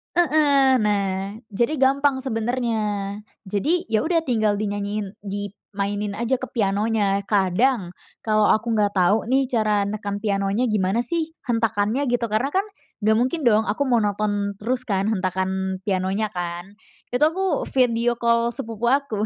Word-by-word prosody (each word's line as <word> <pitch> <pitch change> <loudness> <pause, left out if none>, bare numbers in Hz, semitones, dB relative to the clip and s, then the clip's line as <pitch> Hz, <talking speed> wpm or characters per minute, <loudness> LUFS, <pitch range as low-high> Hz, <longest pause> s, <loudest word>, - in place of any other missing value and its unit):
Heeh. 290 -6 +4
Nah, 200 0 -1
jadi 235 +7 0
gampang 275 0 +3
sebenernya. 240 -1 -1 0.7
Jadi 295 - 0
ya 220 -1 +1
udah 335 +1 +2
tinggal 220 -4 +2
dinyanyiin 205 0 -2 0.2
dimainin 205 0 -4
aja 235 +3 +1
ke 260 0 -5
pianonya. 205 -1 +1
Kadang, 195 0 +1 0.3
kalo 215 -1 +3
aku 220 +2 +1
nggak 205 -1 +2
tahu 190 +2 +3
nih 270 +1 +4
cara 215 -5 +1
neken 205 -1 -4
pianonya 200 +3 0
gimana 205 0 +1
sih, 325 +5 -1 0.2
hentakannya 225 +1 +1
gitu, 245 -1 +1
karena 220 +6 0
kan 385 +4 +1 0.4
nggak 220 +1 +3
mungkin 260 +8 0
dong 220 -1 +4
aku 215 +7 -2
monoton 205 -3 0
terus 250 +4 -1
kan 195 -3 0
hentakan 190 -1 -2
pianonya 190 +2 -1
kan, 175 +1 -6 0.3
itu 245 - 0
aku 375 +4 0
video 240 -2 +2
call 235 0 +2
sepupu 230 -3 -5
aku, 250 -7 0
215 Hz, 140 wpm, -23 LUFS, 200-245 Hz, 0.7 s, Heeh